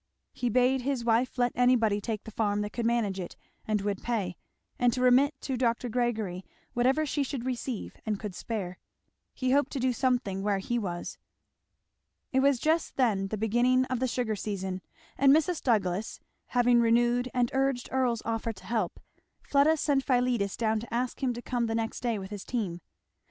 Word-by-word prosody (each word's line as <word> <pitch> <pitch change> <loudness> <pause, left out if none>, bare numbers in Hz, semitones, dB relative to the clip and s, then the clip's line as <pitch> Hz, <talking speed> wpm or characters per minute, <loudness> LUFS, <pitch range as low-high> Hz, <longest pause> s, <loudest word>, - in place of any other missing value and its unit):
He 245 - -1
bade 255 +3 +3
his 255 -2 -2
wife 240 +3 +2
let 245 -1 +2
anybody 230 -5 +3
take 215 0 -3
the 220 - -9
farm 205 -1 0
that 210 0 -3
could 235 0 -1
manage 220 -5 0
it 175 - -6 0.3
and 215 -2 +1
would 200 -1 -2
pay; 205 -7 -2 0.4
and 245 -1 +4
to 255 - -2
remit 265 +4 +5
to 265 - -2
Dr. 240 0 0
Gregory 220 -6 -1 0.3
whatever 265 +6 +2
she 290 0 -1
should 270 -3 -3
receive 255 -3 -4
and 210 -2 -2
could 210 -3 -5
spare. 185 -3 -5 0.6
He 255 -1 0
hoped 285 0 +3
to 275 - -2
do 255 0 +1
something 245 -6 0
where 200 0 +1
he 240 +5 -1
was. 175 -5 -5 1.1
It 265 - +3
was 275 0 +4
just 315 +6 0
then 210 -7 +2
the 215 - -3
beginning 240 +4 +3
of 255 - 0
the 260 - +1
sugar 235 -3 -1
season; 190 -2 -4 0.4
and 275 0 +6
Mrs. 320 +3 +3
Douglass 205 -4 0 0.3
having 245 -1 +4
renewed 240 +2 +3
and 245 -2 +1
urged 270 -2 0
Earl's 250 -4 +1
offer 225 0 -2
of 225 - -5
help, 220 -6 -2 0.4
Fleda 290 +3 +3
sent 280 -2 +1
Philetus 245 -6 +1
down 220 -1 +1
to 230 +1 -9
ask 245 +2 -2
him 260 -2 +1
to 240 - -7
come 240 -2 -1
the 225 - -1
next 225 0 -2
day 235 -3 -1
with 190 0 -7
his 205 -2 -6
team. 195 -8 -3
240 Hz, 190 wpm, -29 LUFS, 210-255 Hz, 1.1 s, and